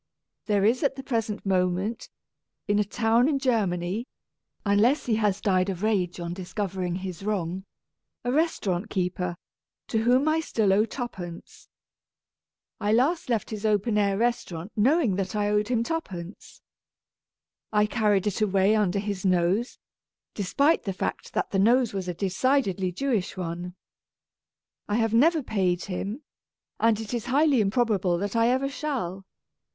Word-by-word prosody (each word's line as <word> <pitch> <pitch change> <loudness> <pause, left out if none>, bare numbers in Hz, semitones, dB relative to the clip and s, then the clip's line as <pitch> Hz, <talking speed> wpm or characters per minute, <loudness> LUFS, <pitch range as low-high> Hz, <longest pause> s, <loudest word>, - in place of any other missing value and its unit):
There 205 -2 +2
is 240 +4 +3
at 275 -2 +1
the 270 - -7
present 225 -6 -2
moment, 190 +3 0 0.6
in 205 0 +2
a - - +4
town 230 +5 +2
in 290 - +1
Germany 215 -4 0 0.6
(unless 225 +8 +3
he 225 -3 +1
has 205 -3 +1
died 185 -1 +1
of 190 0 -4
rage 190 -5 0
on 170 0 -4
discovering 185 -1 -3
his 185 -2 -6
wrong), 190 -2 -2 0.6
a 245 - -1
restaurant 225 - 0
keeper 180 -1 -2 0.5
to 220 - +1
whom 250 +5 +3
I 315 +1 +3
still 220 -11 +1
owe 210 +3 +4
twopence. 190 -9 -7 1.1
I 210 -1 0
last 265 +8 +2
left 230 -2 -1
his 215 -1 -5
open 210 +1 +1
air 200 -2 +2
restaurant 210 -6 -2
knowing 240 - +3
that 195 +1 -2
I 205 0 +1
owed 210 0 +1
him 235 -1 +1
twopence. 195 - -6 1.1
I 210 -1 +3
carried 210 -3 +1
it 210 +1 -1
away 200 0 +3
under 205 -3 +1
his 200 -2 -3
nose, 185 +5 +1 0.6
despite 280 - +2
the 195 - -3
fact - - -4
that - - -1
the 195 - +1
nose 235 +3 +3
was 190 -2 -3
a 180 - -3
decidedly 195 - +1
Jewish 215 -2 -1
one. 175 0 -5 1.1
I 205 - +1
have 225 -1 +1
never 310 +6 +4
paid 185 -6 0
him, 200 +8 -4 0.6
and 225 -1 +3
it 220 +1 -6
is 235 -2 -2
highly 280 -1 +3
improbable 200 -4 +1
that 200 +4 -3
I 230 0 +4
ever 260 +3 +2
shall. 255 - -4
210 Hz, 150 wpm, -26 LUFS, 185-240 Hz, 1.1 s, a